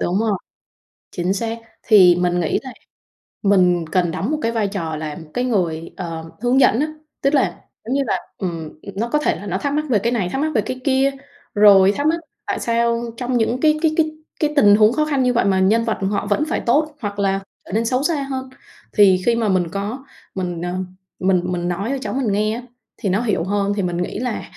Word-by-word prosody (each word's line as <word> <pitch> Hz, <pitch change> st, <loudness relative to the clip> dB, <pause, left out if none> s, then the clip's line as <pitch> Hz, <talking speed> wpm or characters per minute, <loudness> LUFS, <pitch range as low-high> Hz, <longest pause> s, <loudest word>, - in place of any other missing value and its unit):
đúng 180 Hz, +3 st, 0 dB
rồi. 215 Hz, -4 st, 0 dB, 0.7 s
Chính 180 Hz, +2 st, -1 dB
xác. 230 Hz, +2 st, -3 dB, 0.2 s
Thì 190 Hz, -5 st, +7 dB
mình 175 Hz, 0 st, +1 dB
nghĩ 165 Hz, -, 0 dB
là 260 Hz, -2 st, -8 dB, 0.7 s
mình 180 Hz, -4 st, +3 dB
cần 175 Hz, -3 st, +1 dB
đóng 205 Hz, -, -2 dB
một 310 Hz, -, 0 dB
cái 230 Hz, -, 0 dB
vai 225 Hz, -3 st, 0 dB
trò 170 Hz, -6 st, -3 dB
là 155 Hz, -1 st, -5 dB
một 160 Hz, -2 st, -12 dB
cái 250 Hz, +1 st, 0 dB
người, 170 Hz, -8 st, -1 dB
ờ, 165 Hz, -3 st, -6 dB
hướng 245 Hz, +2 st, +3 dB
dẫn 235 Hz, -, +4 dB
á, 300 Hz, -, +1 dB, 0.3 s
tức 275 Hz, +2 st, +2 dB
là 275 Hz, -, +1 dB, 0.2 s
giống 245 Hz, -, -2 dB
như 280 Hz, -, +2 dB
là, -, -, +1 dB, 0.2 s
ừm, 165 Hz, -5 st, -5 dB, 0.2 s
nó 230 Hz, +4 st, -2 dB
có 300 Hz, -, +2 dB
thể 300 Hz, -, +1 dB
là 205 Hz, -, -8 dB
nó 180 Hz, -, -1 dB
thắc 285 Hz, 0 st, -2 dB
mắc 305 Hz, +1 st, 0 dB
về 215 Hz, -5 st, +3 dB
cái 235 Hz, +4 st, 0 dB
này, 195 Hz, -7 st, 0 dB
thắc 270 Hz, -, -2 dB
mắc 310 Hz, +1 st, 0 dB
về 215 Hz, -, +4 dB
cái 255 Hz, +4 st, -5 dB
kia, 270 Hz, 0 st, +2 dB, 0.4 s
rồi 200 Hz, -2 st, +7 dB
thắc 290 Hz, -, +1 dB
mắc 330 Hz, +2 st, +2 dB, 0.3 s
tại -, -, -1 dB
sao 235 Hz, 0 st, +1 dB
trong 250 Hz, 0 st, -1 dB
những 235 Hz, +3 st, 0 dB
cái 305 Hz, 0 st, +3 dB
cái 320 Hz, -2 st, +2 dB
cái 310 Hz, -1 st, +2 dB, 0.3 s
cái 300 Hz, -1 st, 0 dB
tình 205 Hz, -8 st, +6 dB
huống 215 Hz, +2 st, +5 dB
khó 305 Hz, +3 st, +1 dB
khăn 280 Hz, -4 st, +1 dB
như 250 Hz, 0 st, +2 dB
vậy 235 Hz, -, +2 dB
mà 190 Hz, -1 st, +2 dB
nhân 215 Hz, +5 st, +3 dB
vật 220 Hz, -, -1 dB
họ 205 Hz, -, -1 dB
vẫn 300 Hz, -, +1 dB
phải -, -, 0 dB
tốt 300 Hz, +5 st, +1 dB
hoặc 205 Hz, -2 st, -4 dB
là 195 Hz, -1 st, +1 dB, 0.3 s
trở -, -, -11 dB
nên 225 Hz, +1 st, +1 dB
xấu 255 Hz, +3 st, 0 dB
xa 295 Hz, -3 st, 0 dB
hơn. 260 Hz, -1 st, -4 dB, 0.4 s
Thì 190 Hz, -3 st, +5 dB
khi 235 Hz, -1 st, +3 dB
mà 225 Hz, -3 st, 0 dB
mình 185 Hz, -2 st, +2 dB
có 205 Hz, +9 st, -4 dB, 0.3 s
mình, 175 Hz, -3 st, -3 dB
ờ, 175 Hz, 0 st, -3 dB, 0.5 s
mình 185 Hz, -1 st, +2 dB
mình 175 Hz, -1 st, -2 dB
nói 185 Hz, +5 st, -2 dB
cho 275 Hz, -, -1 dB
cháu -, -, -4 dB
mình 255 Hz, -5 st, 0 dB
nghe 215 Hz, +2 st, +1 dB
á 240 Hz, -, -7 dB, 0.3 s
thì 200 Hz, -, -2 dB
nó 200 Hz, +5 st, +1 dB
hiểu 210 Hz, -8 st, 0 dB
hơn, 200 Hz, +2 st, 0 dB
thì 205 Hz, -, -1 dB
mình 175 Hz, -1 st, -2 dB
nghĩ 180 Hz, +3 st, -3 dB
là, 245 Hz, -2 st, -3 dB
215 Hz, 240 wpm, -20 LUFS, 185-255 Hz, 0.7 s, Thì